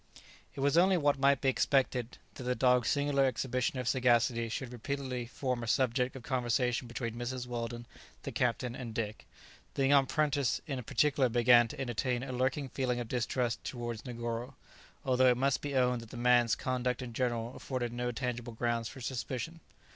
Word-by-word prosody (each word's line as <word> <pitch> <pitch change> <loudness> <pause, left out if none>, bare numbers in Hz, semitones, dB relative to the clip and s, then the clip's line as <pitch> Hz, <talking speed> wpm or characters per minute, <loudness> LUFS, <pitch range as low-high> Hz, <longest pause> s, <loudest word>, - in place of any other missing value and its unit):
It - - -5
was 140 +4 +4
only 185 +1 +4
what 145 -3 +2
might 140 0 +4
be 135 - +3
expected 130 -2 +1 0.2
that - - -9
the 125 0 -1
dog's 125 -2 +3
singular 145 -1 +2
exhibition 130 0 -1
of 125 -2 -3
sagacity 120 -2 +2
should 125 +1 -4
repeatedly 125 0 -4
form 125 0 -2
a 115 - -5
subject 125 +2 +1
of 130 - -8
conversation 125 -1 0
between 120 -1 -4
Mrs. 120 +1 -4
Weldon, 120 -1 -4 0.4
the - - -4
captain, 125 0 0
and 120 -3 -7
Dick. 110 -2 -4 0.5
The 135 - +2
young 140 0 +5
apprentice 145 -2 +1
in 135 -5 -3
particular 135 +2 +2
began 120 0 +6
to 115 - -9
entertain 125 -1 -1
a 135 - -5
lurking 130 +2 0
feeling 125 -2 -1
of 120 -2 -5
distrust 120 -1 -1
towards 120 -2 -5
Negoro, 120 +1 -4 0.5
although 130 -1 +4
it 125 - +3
must 135 +1 +1
be 145 -1 -4
owned 125 -2 +2
that 115 - -12
the 120 - -9
man's 120 -1 +4
conduct 125 0 -1
in 120 -2 -7
general 120 -1 -1
afforded 120 -3 -3
no 120 0 -2
tangible 120 -1 -4
grounds 115 0 -1
for 135 - -11
suspicion. 130 +6 -4
125 Hz, 180 wpm, -32 LUFS, 120-135 Hz, 0.5 s, began